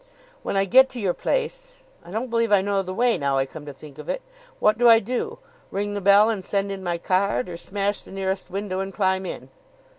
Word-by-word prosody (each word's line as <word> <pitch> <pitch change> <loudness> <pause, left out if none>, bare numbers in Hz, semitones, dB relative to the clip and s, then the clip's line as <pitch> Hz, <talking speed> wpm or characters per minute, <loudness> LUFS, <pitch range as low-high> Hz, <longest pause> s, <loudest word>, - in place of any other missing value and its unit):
"When - - -2
I 195 - +3
get 260 +6 +6
to 250 - -7
your 190 -5 0
place - - -3 0.2
I - - -14
don't 225 +6 -4
believe 230 -1 +1
I 200 -2 +5
know 200 -1 +1
the 185 -1 -6
way, 240 +4 +2
now 140 -1 +1
I 135 - +2
come 150 +2 -11
to - - -5
think 140 +1 -14
of - - -9
it - - -2 0.4
what 215 +2 +3
do 240 -1 +6
I 225 - +9
do? 240 +3 -3 0.3
Ring 205 +1 -3
the 205 - -3
bell 200 +2 +6
and 215 -4 -1
send 200 +1 -1
in 195 -1 -5
my 175 -2 -1
card? 185 -6 0
or 175 - -6
smash 200 +3 -2
the - - -13
nearest 190 0 -3
window 195 -1 -3
and 195 0 -3
climb 190 -1 0
in?" - - -7
200 Hz, 240 wpm, -24 LUFS, 185-225 Hz, 0.4 s, I